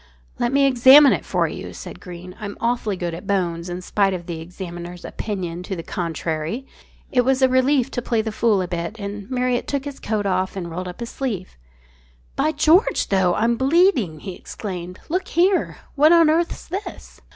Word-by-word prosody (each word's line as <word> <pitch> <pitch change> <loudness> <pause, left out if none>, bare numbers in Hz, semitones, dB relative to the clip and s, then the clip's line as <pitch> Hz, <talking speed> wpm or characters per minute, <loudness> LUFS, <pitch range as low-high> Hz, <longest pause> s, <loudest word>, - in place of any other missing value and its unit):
"Let 240 0 +1
me 280 0 +4
examine 270 +2 +8
it - - -2
for - - 0
you," - - -7
said - - -9
Greene. 180 0 -10
"I'm 205 -1 -6
awfully 230 -4 -1
good 175 -2 -3
at 170 +4 -8
bones 175 -3 -1
in 180 +1 -5
spite 195 0 +1
of 175 -1 -7
the 165 -2 -5
examiners' 175 0 -8
opinion 180 -5 -4
to 190 +1 -5
the 165 - -6
contrary." 165 - -3 0.5
It 250 - +4
was 265 +1 +2
a - - +7
relief 260 0 +2
to 245 - -2
play 230 -2 0
the 220 - -3
fool 215 -3 +2
a - - -4
bit, 175 +5 -4
and 200 +1 -6
Marriott 250 -1 0
took 280 -1 -2
his 285 -1 -7
coat 210 -1 -2
off 185 0 0
and 175 -3 -5
rolled 180 +2 -4
up 180 +5 -8
his 235 - -5
sleeve. 215 -9 -4 0.8
"By 310 - +1
George, 315 +6 +3
though, 190 -3 +3
I'm 230 +1 +1
bleeding!" 265 - +2
he 190 - -6
exclaimed. 180 -1 -7
"Look 365 +4 -1
here! 365 +3 +2 0.2
What 300 +2 +5
on 335 -2 +6
earth's 335 +2 -1
this?" 390 +4 -7
210 Hz, 195 wpm, -22 LUFS, 180-265 Hz, 0.8 s, examine